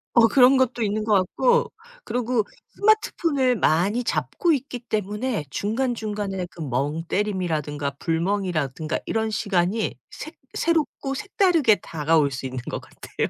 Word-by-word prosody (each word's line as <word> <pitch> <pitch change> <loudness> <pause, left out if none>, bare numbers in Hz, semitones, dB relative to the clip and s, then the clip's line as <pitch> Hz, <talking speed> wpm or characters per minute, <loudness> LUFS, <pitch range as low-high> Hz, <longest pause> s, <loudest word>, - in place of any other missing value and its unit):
어 235 -2 +7
그런 260 +2 +6
것도 245 -3 +1
있는 215 +1 -1
것 215 - +2
같고 475 - +2 0.3
그리고 245 -2 0 0.3
스마트폰을 330 - +2
많이 200 +6 +2
잡고 155 - 0
있기 265 -3 -3
때문에 215 - -2
중간중간에 210 - -2
그 165 - -10
멍 145 +4 -1
때림이라든가 155 -8 -1
불멍이라든가 165 -4 -1
이런 220 0 0
시간이 200 +1 0 0.2
새 310 - -8 0.2
새롭고 305 -4 0
색다르게 350 - +3
다가올 155 -2 +1
수 135 0 -5
있는 130 -1 -4
것 - - -3
같아요. - - -5
210 Hz, 310 characters per minute, -24 LUFS, 165-255 Hz, 0.3 s, 어